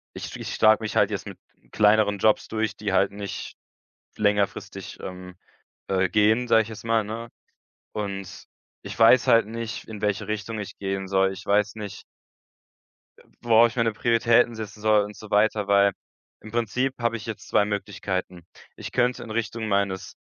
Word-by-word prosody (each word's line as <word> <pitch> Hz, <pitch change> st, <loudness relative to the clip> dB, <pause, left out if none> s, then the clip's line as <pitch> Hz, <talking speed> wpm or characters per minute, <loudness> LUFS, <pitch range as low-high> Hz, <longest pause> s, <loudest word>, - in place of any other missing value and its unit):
ich -, -, -7 dB
ich -, -, -5 dB
schlage 110 Hz, 0 st, +4 dB
mich 110 Hz, -, -4 dB
halt -, -, +4 dB
jetzt -, -, -4 dB
mit -, -, -9 dB, 0.3 s
kleineren 105 Hz, -1 st, +3 dB
Jobs 110 Hz, +1 st, +2 dB
durch, 110 Hz, 0 st, -2 dB
die 105 Hz, -2 st, -3 dB
halt 100 Hz, +1 st, +3 dB
nicht 100 Hz, -1 st, -7 dB, 0.6 s
längerfristig, 105 Hz, -1 st, -1 dB
ähm 90 Hz, 0 st, -8 dB, 0.5 s
äh, 95 Hz, -1 st, +1 dB
gehen, 110 Hz, +4 st, +2 dB
sage 115 Hz, -1 st, +5 dB
ich 110 Hz, -, -10 dB
jetzt 110 Hz, -1 st, -9 dB
mal, 115 Hz, -1 st, +1 dB
ne? 115 Hz, +3 st, -6 dB, 0.7 s
Und, 100 Hz, -3 st, -5 dB, 0.4 s
ich -, -, -8 dB
weiß 115 Hz, +2 st, +6 dB
halt 115 Hz, -2 st, +5 dB
nicht, 115 Hz, 0 st, -6 dB
in 105 Hz, -2 st, -8 dB
welche 105 Hz, 0 st, -1 dB
Richtung 110 Hz, +1 st, -4 dB
ich 105 Hz, -, -7 dB
gehen 95 Hz, -1 st, -3 dB
soll. 95 Hz, 0 st, +2 dB
Ich -, -, -11 dB
weiß 105 Hz, 0 st, +1 dB
nicht 105 Hz, -2 st, -8 dB, 1.2 s
Äh, -, -, -19 dB, 0.2 s
worauf 115 Hz, 0 st, +5 dB
ich 115 Hz, -, -13 dB
meine 115 Hz, -2 st, +1 dB
Prioritäten 115 Hz, +1 st, +3 dB
setzen 105 Hz, -1 st, -8 dB
soll 110 Hz, -1 st, +4 dB
und 105 Hz, +1 st, -8 dB
so 110 Hz, -, -12 dB
weiter, 105 Hz, 0 st, +2 dB
weil 100 Hz, 0 st, +4 dB, 0.5 s
im 110 Hz, -, -11 dB
Prinzip 120 Hz, +3 st, -1 dB
habe 115 Hz, -1 st, 0 dB
ich 105 Hz, -, -10 dB
jetzt 110 Hz, -2 st, -7 dB
zwei 105 Hz, -, +3 dB
Möglichkeiten. 95 Hz, -4 st, -4 dB, 0.3 s
Ich -, -, -8 dB
könnte 125 Hz, 0 st, 0 dB
in 110 Hz, -, -9 dB
Richtung 115 Hz, 0 st, -3 dB
meines 100 Hz, -2 st, -1 dB
105 Hz, 175 wpm, -25 LUFS, 100-115 Hz, 1.2 s, weiß